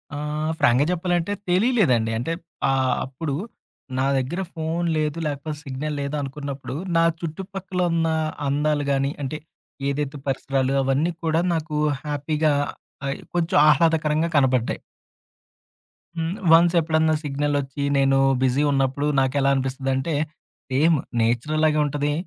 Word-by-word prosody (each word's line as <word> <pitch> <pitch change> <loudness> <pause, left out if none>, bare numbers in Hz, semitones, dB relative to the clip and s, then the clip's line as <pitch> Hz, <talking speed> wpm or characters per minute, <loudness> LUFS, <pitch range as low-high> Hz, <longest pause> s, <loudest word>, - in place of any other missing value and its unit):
ఆ - - -4 0.4
ఫ్రాంక్‌గా 140 0 +4
జెప్పాలంటే 175 +2 0 0.2
తెలీలేదండి. 180 - +3
అంటే 145 +7 -2 0.4
ఆహ్, 130 -1 +2
అప్పుడు 135 +2 -4 0.6
నా 130 - +2
దగ్గర 135 +9 -2
ఫోన్ 165 +2 -2
లేదు, 150 +1 -1
లేపోతే 150 +1 -4
సిగ్నల్ 145 +2 -4
లేదు 140 +1 -3
అనుకున్నప్పుడు 140 -1 -5 0.2
నా 165 - +5 0.2
చుట్టుపక్కల 190 +2 -5
ఉన్న 165 -1 +1 0.4
అందాలు 145 +1 +1
గాని, 140 0 +1
అంటే 140 +3 -3 0.5
ఏదైతే 145 0 -2
పరిసరాలు 135 0 0
అవన్నీ 135 +6 +1
కూడా 160 0 +2
నాకు 160 -2 -3 0.3
హ్యాపీగా 150 +1 0 0.6
అయి 140 - -2 0.2
కొంచెం 170 -2 +1
ఆహ్లాదకరంగా 155 +1 +3
కనబడ్డాయి. 130 -4 +2 1.4
హ్మ్. 165 +5 -2 0.2
వన్స్ 170 +1 +6
ఎప్పుడన్నా 160 0 +2
సిగ్నలొచ్చి, 145 -1 -1
నేను 135 0 +3 0.3
బిజీ 130 +3 +2
ఉన్నప్పుడు 135 +1 +1
నాకెలా 135 +1 +2
అనిపిస్తది 135 0 -2
అంటే, 145 +4 -1 0.5
సేమ్ 155 +4 +3 0.2
నేచర్ 120 +7 0
అలాగే 155 -1 +3
ఉంటది, 145 0 -1
145 Hz, 120 wpm, -23 LUFS, 135-160 Hz, 1.4 s, వన్స్